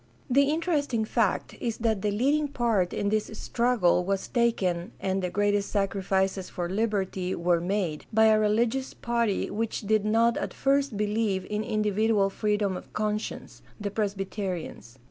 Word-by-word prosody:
The 280 +2 +4
interesting 295 -8 0
fact 220 -3 0
is 230 -2 -2
that 220 -4 0
the 210 - +1
leading 280 +9 +1
part 230 -9 +1
in 200 - -1
this 215 0 +1
struggle 235 -8 +2
was 195 +1 -1
taken, 190 -8 0
and 190 0 -1
the 180 - -1
greatest 205 +2 +1
sacrifices 195 -1 0
for 175 -1 -3
Hberty 190 -3 -1
were 170 0 +1
made, 180 -4 -2
by 220 +1 +5
a 215 -1 +5
religious 230 +5 +1
party 235 -4 -1
which 225 +1 -2
did 215 0 +1
not 230 +2 +3
at - - -4
first 275 -4 +1
believe 210 -2 0
in 210 +1 -1
individual 210 -1 +1
freedom 205 -2 0
of - - -9
conscience 210 0 -3
— - - -28
the 205 -1 -3
Presbyterians. 195 - -4
210 Hz, 155 wpm, -27 LUFS, 195-230 Hz, -, by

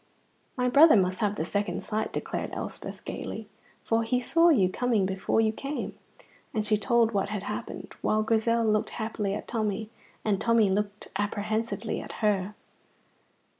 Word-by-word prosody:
"My 250 0 +1
brother 295 +6 +7
must 185 -2 +2
have 210 -1 +1
the 160 - -2
second 205 +3 -2
sight," 215 0 -2
declared - - -4
Elspeth, - - -6
gaily, - - -5 0.4
"for 225 0 +2
he 230 +2 +1
saw 330 +7 +4
you 215 - +5
coming 220 +1 +1
before 190 +3 0
you 220 -1 +2
came"; 275 +6 -4 0.6
and 215 -1 0
she 215 0 +3
told 230 +1 +3
what 200 -2 0
had 205 -2 -3
happened, - - -6
while 215 0 +2
Grizel 225 +1 +2
looked 215 -1 +2
happily 215 -3 -2
at - - -6
Tommy, 215 -1 -2 0.3
and 205 -3 +1
Tommy 230 -4 +4
looked 205 +1 -2
apprehensively 210 +1 -2
at - - -8
her. 205 0 +1
215 Hz, 160 wpm, -28 LUFS, 205-230 Hz, 0.6 s, brother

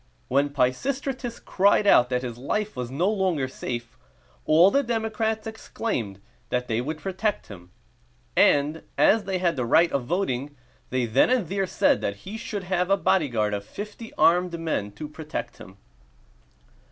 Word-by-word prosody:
When 140 +3 +2
Pisistratus 245 - -1
cried 200 +2 +2
out 125 -11 +6
that 125 0 -1
his 120 -2 -5
life 210 +11 -2
was 125 -1 -4
no 155 +8 0
longer 190 -10 0
safe, 120 -2 -6 0.5
all 170 +5 +6
the 280 - +3
democrats 220 -2 -2
exclaimed 205 - -4 0.3
that 125 0 -1
they 115 0 0
would 150 +5 -4
protect 195 +5 -2
him; 90 -4 -11 0.7
and, 150 +3 +3 0.2
as 215 -2 +4
they 190 -1 -1
had 175 -4 0
the 125 - 0
right 165 +8 +4
of 135 -3 -1
voting, 145 -4 -2 0.3
they 130 -1 0
then 115 - +3
and 250 -8 +1
there 195 -1 -1
said - - +2
that 100 - -2
he 200 +3 -6
should 215 -4 -5
have 180 0 0
a 195 - +4
bodyguard 120 - +1
of 100 -1 -3
fifty 210 - -8
armed 175 0 +3
men 155 -11 -2
to 150 +8 -7
protect 155 +1 -6
him. 95 +1 -13
165 Hz, 165 wpm, -25 LUFS, 125-205 Hz, 0.7 s, out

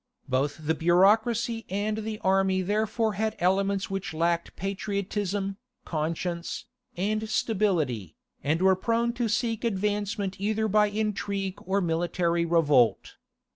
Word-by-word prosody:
Both 140 +4 -1
the 160 - +2
bureaucracy 220 +7 +3
and 210 +3 -1
the 220 0 -4
army 190 0 +2
therefore 215 +3 0
had 220 +2 -1
elements 195 +2 +1
which 195 -4 -4
lacked 170 +1 0
patriotism, 200 0 -2 0.3
conscience, 170 +2 -3 0.3
and 215 +4 -1
stability, 170 - 0 0.3
and 160 +5 +1
were 190 0 +6
prone 230 +4 0
to 240 -1 -1
seek 230 0 -1
advancement 205 -2 -1
either 220 +1 +1
by 210 0 +4
intrigue 205 -2 -2
or 195 +1 +2
military 170 0 0
revolt. 150 -8 +3
195 Hz, 120 wpm, -27 LUFS, 175-215 Hz, 0.3 s, were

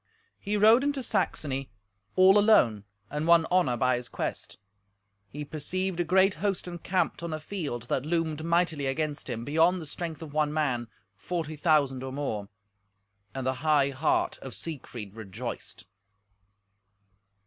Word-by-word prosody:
He 210 +1 -1
rode 220 +5 +6
into 285 -2 -1
Saxony 135 - -1 0.5
all 190 +2 +7
alone, 120 - +4 0.3
and 150 +2 -2
won 170 -1 +6
honour 175 -10 +3
by 125 +1 +2
his 125 - -6
quest. - - -4 0.7
He 150 +8 -7
perceived 175 +5 -3
a - - +3
great 190 +3 +4
host 200 -3 -1
encamped 180 +1 -1
on 170 -1 -4
a 155 - -3
field, 150 - -4
that 125 +1 -1
loomed 160 -1 -1
mightily 170 -4 +1
against 150 +1 -2
him, 120 -1 -4
beyond 165 +5 +3
the 160 - -7
strength 165 +1 -5
of 150 -3 -9
one 150 -1 +1
man: 130 -6 0 0.3
forty 155 - -4
thousand 145 -4 +2
or 130 0 -5
more. 110 -8 -3 0.9
And 135 -1 -3
the 130 - +1
high 145 -3 +3
heart 140 +4 0
of 135 - -8
Siegfried 125 -10 -7
rejoiced. 110 +1 -6
155 Hz, 150 wpm, -28 LUFS, 130-175 Hz, 0.9 s, all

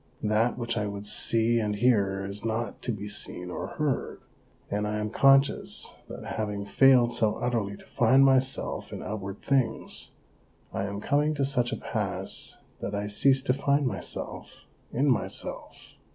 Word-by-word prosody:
That 110 +3 +2
which 115 -1 -2
I 105 - -1
would 100 0 -6
see 115 +2 +2
and 105 -2 -1
hear 100 -4 +2
is 100 +1 -5
not 115 +1 -3
to 120 - -2
be 105 -2 -5
seen 90 -3 -3
or - - -5
heard^ 150 -4 -1 0.5
and 105 +1 0
I 105 0 -2
am 105 0 -3
conscious 135 +2 +3 0.2
that - - -8
having 105 -2 -2
failed 120 +3 +5
so 110 -3 +1
utterly 115 -5 -2
to - - -16
find 130 +4 +4
myself 135 0 +1
in - - -6
outward 100 -2 -6
things, 135 -4 0 0.6
I 95 - -1
am 100 0 -5
coming 150 +4 +1
to 140 -2 +1
such 125 -3 +1
a - - -2
pass - - -2 0.2
that 100 - -4
I 100 0 -2
cease 130 +6 +4
to 125 - +2
find 140 +1 +1
myself 100 -8 -5 0.3
in 135 +4 +1
myself. 130 - -2
115 Hz, 165 wpm, -27 LUFS, 105-130 Hz, 0.6 s, failed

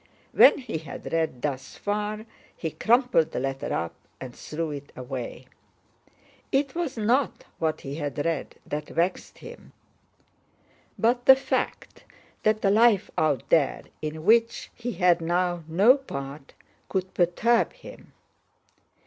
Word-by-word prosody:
When - - +7
he 240 - -5
had 160 - -8
read 160 -7 -1
thus 135 -3 -4
far, 210 +1 -3 0.3
he 160 - -3
crumpled 240 - +2
the - - -1
letter 135 +1 -3
up 85 - -2 0.3
and 125 -2 -8
threw 160 0 -4
it 145 0 -8
away. 125 0 -6 1.1
It 275 -1 +1
was 335 -7 -3
not 240 +6 +1 0.2
what 160 -1 -1
he 135 - -6
had 145 -2 -3
read 165 -4 -2
that 150 0 -5
vexed 175 +3 -2
him, 475 +1 -12 1.2
but 240 +2 +1
the 265 - +11
fact 270 - -3 0.4
that 215 0 +1
the 195 - +4
life 220 -2 +4
out 145 -6 +1
there 150 -5 +2 0.2
in 155 +1 -5
which 230 +2 +3
he 240 0 -5
had 180 -2 +3
now 175 +1 0
no 200 - +5
part 140 - -8 0.3
could 190 -1 -2
perturb 210 +7 +2
him. - - -13
175 Hz, 135 wpm, -26 LUFS, 150-230 Hz, 1.2 s, the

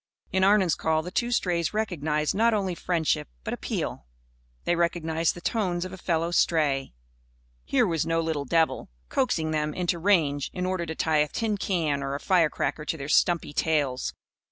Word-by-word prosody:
In 190 0 +2
Arnon's 195 -4 +4
call 160 0 0
the 180 - -7
two 240 +5 0
strays 180 -6 0
recognised 155 -8 0
not 225 +2 +3
only 190 -3 -1
friendship, 170 -2 0 0.2
but - - -3
appeal. - - -4 0.6
They 175 - +1
recognised 165 -1 0
the 175 - -9
tones 185 -5 -1
of 185 - -7
a - - -7
fellow 170 -1 0
stray. 145 - +1 0.7
Here 255 -3 +3
was 165 -6 0
no 165 0 0
little 160 -3 -1
devil, 160 +4 +1 0.2
coaxing 170 -12 0
them 150 -1 -1
into 175 -1 -1
range 160 -7 +2
in 180 0 -2
order 185 -2 -2
to 160 - -4
tie 160 0 +1
a 150 0 +3
tin 215 +7 -1
can 165 -8 -1
or 135 0 -2
a - - -4
firecracker 165 -3 +1
to 160 - -3
their 140 0 -6
stumpy 170 -1 +2
tails. 145 -5 0
165 Hz, 180 wpm, -26 LUFS, 155-185 Hz, 0.7 s, Arnon's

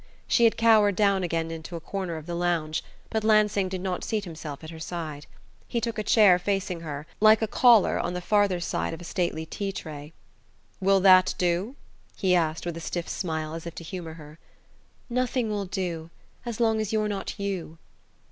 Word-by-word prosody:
She 235 - +4
had 225 - +3
cowered 215 -3 +5
down 200 -2 +3
again 165 -2 -2
into 165 +1 -7
a - - -4
corner 185 0 -4
of 155 - -9
the 175 - -5
lounge; 170 -3 -1 0.3
but 220 -1 -1
Lansing 210 -3 +3
did 185 -1 -4
not 185 -1 -3
seat 215 -2 -2
himself 155 -4 -8
at 160 - -8
her 160 - -9
side. 160 -3 -6 0.4
He 235 - -1
took 230 -1 -3
a - - -1
chair 200 -4 +5
facing 185 -2 -2
her, 150 -3 -6
like 215 +1 +6
a - - +1
caller 235 -2 +5
on 180 - -2
the - - -2
farther 200 -1 +2
side 170 - -2
of 165 - -12
a - - -8
stately 170 -2 -2
tea 195 +4 -4
tray. 155 -5 -8 0.7
"Will 195 0 +3
that 185 -1 +6
do?" 180 +8 0 0.4
he 185 -2 +1
asked 165 -2 +1
with 170 -1 -4
a - - -7
stiff 170 +1 -4
smile, 160 -3 -3
as 165 +1 -6
if 170 - -8
to - - -7
humour 165 -2 -7
her. 155 0 -13 0.7
"Nothing 250 -2 -1
will 205 -1 -2
do 175 -4 -4 0.4
as 235 -1 -4
long 225 -2 +2
as 215 - -3
you're 215 -1 +1
not 200 0 -4
you!" 190 -5 -4
180 Hz, 200 wpm, -26 LUFS, 165-210 Hz, 0.7 s, like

